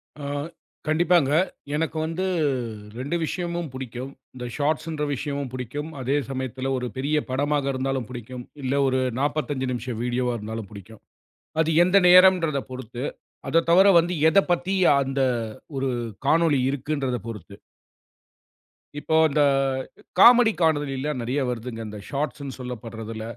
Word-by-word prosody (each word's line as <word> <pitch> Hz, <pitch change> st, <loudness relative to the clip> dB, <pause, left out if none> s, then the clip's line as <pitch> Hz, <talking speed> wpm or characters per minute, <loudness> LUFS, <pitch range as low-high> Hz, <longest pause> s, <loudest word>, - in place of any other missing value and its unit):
ஆ, 145 Hz, -, -8 dB, 0.6 s
கண்டிப்பாங்க. 160 Hz, -2 st, +3 dB, 0.4 s
எனக்கு 160 Hz, +1 st, -1 dB
வந்து 165 Hz, +4 st, -2 dB, 0.7 s
2 140 Hz, +6 st, -2 dB
விஷயமும் 170 Hz, -1 st, -3 dB
புடிக்கும். 130 Hz, 0 st, -6 dB, 0.2 s
இந்த 125 Hz, -1 st, -6 dB
ஷார்ட்ஸ்ன்ற 155 Hz, +1 st, -1 dB
விஷயமும் 140 Hz, -1 st, -4 dB
புடிக்கும். 135 Hz, +5 st, -5 dB
அதே 130 Hz, +3 st, 0 dB
சமயத்துல 130 Hz, 0 st, -3 dB
ஒரு 125 Hz, -, -3 dB
பெரிய 145 Hz, +3 st, 0 dB
படமாக 145 Hz, +1 st, 0 dB
இருந்தாலும் 130 Hz, -2 st, -2 dB
புடிக்கும். 125 Hz, 0 st, -8 dB, 0.2 s
இல்ல 130 Hz, +1 st, 0 dB
ஒரு 130 Hz, 0 st, +1 dB, 0.2 s
45 145 Hz, -2 st, -1 dB
நிமிஷம் 120 Hz, -2 st, -4 dB
வீடியோவா 125 Hz, 0 st, 0 dB
இருந்தாலும் 110 Hz, 0 st, -6 dB
புடிக்கும். 105 Hz, +1 st, -12 dB, 0.6 s
அது 160 Hz, -, -1 dB
எந்த 185 Hz, +2 st, +3 dB
நேரம்ன்றத 180 Hz, -5 st, +6 dB
பொறுத்து. 125 Hz, 0 st, -6 dB, 0.4 s
அத 165 Hz, +1 st, +3 dB
தவர 190 Hz, +3 st, +7 dB
வந்து 175 Hz, +2 st, -2 dB, 0.2 s
எதப் 195 Hz, -1 st, +3 dB
பத்தி 175 Hz, +2 st, +1 dB, 0.3 s
அந்த 135 Hz, 0 st, -2 dB, 0.6 s
ஒரு 135 Hz, 0 st, 0 dB, 0.4 s
காணொளி 165 Hz, -3 st, +4 dB
இருக்குன்றத 140 Hz, -2 st, -2 dB
பொறுத்து. 105 Hz, -4 st, -8 dB, 1.5 s
இப்போ 160 Hz, -, -1 dB
அந்த 150 Hz, +1 st, +1 dB, 0.8 s
காமெடி 240 Hz, +1 st, +8 dB
காணொளிலாம் 145 Hz, -3 st, 0 dB
நெறைய 130 Hz, +5 st, -1 dB
வருதுங்க. 120 Hz, -1 st, -5 dB
அந்த 105 Hz, 0 st, -8 dB
ஷார்ட்ஸ்ன்னு 140 Hz, -1 st, -3 dB
சொல்லப்படுறதுல 115 Hz, -2 st, -6 dB
135 Hz, 125 wpm, -24 LUFS, 125-155 Hz, 1.5 s, காமெடி